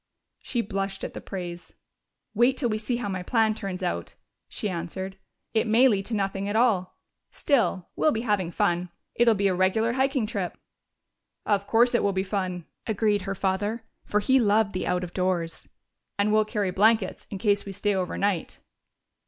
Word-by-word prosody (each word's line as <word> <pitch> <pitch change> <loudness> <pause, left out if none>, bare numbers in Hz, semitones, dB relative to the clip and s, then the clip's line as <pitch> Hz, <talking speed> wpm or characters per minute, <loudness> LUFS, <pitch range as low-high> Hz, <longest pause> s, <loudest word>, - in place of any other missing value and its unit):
She 240 - -2
blushed 195 -1 -3
at - - -4
the - - -7
praise. 175 -3 -7 0.6
"Wait 240 +4 +3
till 245 -5 0
we 215 0 -1
see 230 +3 -1
how 245 - -3
my 185 -2 -3
plan 220 +3 +2
turns 195 -4 -5
out," 85 0 -3 0.3
she - - -3
answered. 190 +1 -4 0.4
"It 225 +1 +2
may 235 +4 +6
lead 200 -5 +1
to 230 - -2
nothing 195 0 -1
at 205 - -2
all.... 220 -6 +2 0.3
Still, 200 - +1
we'll 310 - +3
be 225 - -1
having 205 -7 0
fun. 175 +1 0 0.2
It'll 235 -1 +4
be 200 0 +2
a 190 - +2
regular 195 +6 +2
hiking 265 -2 +1
trip." 200 -5 -3 0.9
"Of 200 -1 +1
course 240 +2 +4
it 240 - +3
will 200 - +1
be 190 0 0
fun," 185 -3 -3 0.2
agreed 210 -1 +1
her 195 +1 -3
father, 205 +5 -1 0.2
for 210 - 0
he 260 +5 +4
loved 210 -2 +3
the 185 - -2
out 180 0 0
of 175 - -7
doors. 180 -3 -1 0.5
"And 205 +1 +2
we'll 215 0 +4
carry 210 -3 -1
blankets 215 +1 +2
in 200 - -5
case 205 0 +1
we 200 - -5
stay 200 +1 0
overnight." 190 -1 -1
200 Hz, 185 wpm, -26 LUFS, 185-220 Hz, 0.9 s, may